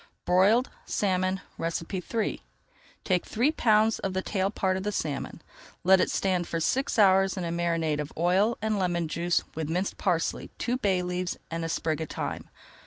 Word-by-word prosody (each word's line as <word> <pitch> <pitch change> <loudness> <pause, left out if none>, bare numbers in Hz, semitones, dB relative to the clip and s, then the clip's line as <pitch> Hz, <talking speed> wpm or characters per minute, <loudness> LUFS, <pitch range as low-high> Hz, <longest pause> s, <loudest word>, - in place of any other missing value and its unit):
BROILED 200 +8 +4 0.2
SALMON 185 -1 0 0.2
III 180 +6 -2 0.6
Take 180 -2 +1
three 245 +7 +2
pounds 220 -6 +3
of 190 - -3
the 190 0 -1
tail 195 -1 0
part 190 -2 0
of 190 - -2
the 210 +2 -2
salmon, 150 -8 -4 0.4
let 190 +1 +6
it - - +1
stand 185 -3 0
for 165 - -2
six 260 +13 0
hours 195 -2 +5
in 185 - -2
a 170 - -2
marinade 165 -3 0
of 150 0 -4
oil 185 +7 +2
and 215 -2 0
lemon 175 -3 0
juice, 170 +3 0
with 160 -1 -4
minced 180 +4 -2
parsley, 175 -4 0
two 245 +1 -1
bay 195 -7 +1
leaves 180 0 -2
and 165 0 -3
a 165 - -2
sprig 160 -1 -1
of 160 - -4
thyme. - - -4
185 Hz, 175 wpm, -27 LUFS, 170-200 Hz, 0.6 s, let